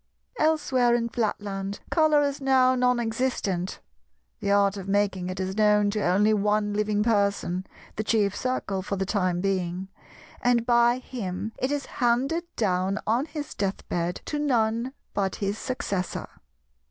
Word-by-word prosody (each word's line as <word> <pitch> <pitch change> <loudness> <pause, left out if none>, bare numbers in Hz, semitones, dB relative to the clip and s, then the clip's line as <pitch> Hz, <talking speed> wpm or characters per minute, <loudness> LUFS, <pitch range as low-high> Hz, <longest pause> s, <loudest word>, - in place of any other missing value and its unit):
Elsewhere 290 -6 +3
in 235 -1 0
Flatland, 205 -3 -3
Colour 310 -3 +4
is 280 0 -2
now 260 -1 +4
non 250 -1 +2
existent. 225 -6 -2 0.6
The - - -2
art 200 0 +3
of 195 -1 -7
making 195 -2 0
it 185 +1 -5
is 190 0 -2
known 210 -1 +4
to 210 0 -1
only 205 +4 +3
one 210 0 +1
living 210 0 +1
person, 200 -4 0 0.3
the 215 - -1
Chief 210 -2 +1
Circle 225 -7 -2
for 195 +1 -3
the 190 0 -1
time 185 -3 0
being; 190 -1 -1 0.5
and 240 -1 +2
by 240 0 +4
him 220 -5 -5
it 260 - 0
is 290 -1 -1
handed 260 +8 0
down 190 -1 0
on 240 +7 +1
his 295 -2 -6
death 195 -1 -3
bed 175 0 -2
to 295 - -2
none 235 -3 +1 0.2
but 195 -2 0
his 200 +1 -2
Successor. 200 -8 -3
210 Hz, 155 wpm, -26 LUFS, 195-250 Hz, 0.6 s, Colour